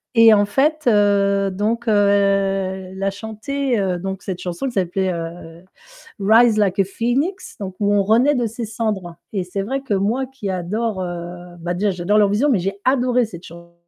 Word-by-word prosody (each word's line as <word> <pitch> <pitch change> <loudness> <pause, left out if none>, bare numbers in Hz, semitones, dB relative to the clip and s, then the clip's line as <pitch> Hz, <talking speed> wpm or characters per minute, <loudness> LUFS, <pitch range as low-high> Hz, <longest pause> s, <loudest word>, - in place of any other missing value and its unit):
et 230 -1 +8
en 205 -1 +4
fait, 300 +8 +1
heu, 200 -2 +3
donc 220 +5 -2
heu, - - +3 0.2
elle 195 -1 0
a 195 0 +1
chanté, 230 +5 -3
heu, 185 -2 0
donc 190 +2 -5
cette 185 -2 -4
chanson 180 +6 -4
qui 255 - -5
s'appelait, 190 -1 0
heu, 165 0 -8 0.6
Rise 220 +3 +5
Like 200 -2 +1
a - - +6
Phoenix, 255 - -2
donc 190 -2 -5
où 205 -1 +2
on 205 -1 +3
renaît 240 +8 +3
de 245 -2 0
ses 230 +1 -4
cendres, 210 -6 -3 0.2
et 190 -4 -2
c'est 190 +2 -3
vrai 260 +8 -2
que 270 -6 -3
moi, 215 +7 0
qui 260 -6 -7
adore, 190 +3 -2
heu 175 0 -7
bah, 175 +1 -2
déjà, 200 +3 0
j'adore 185 +3 0
leur 210 - +5
vision, 230 +9 +2
mais 230 - +3
j'ai 195 +3 -2
adoré 250 -2 +2
cette 175 -5 -11
chanson 170 +1 -13
200 Hz, 195 wpm, -20 LUFS, 185-230 Hz, 0.6 s, et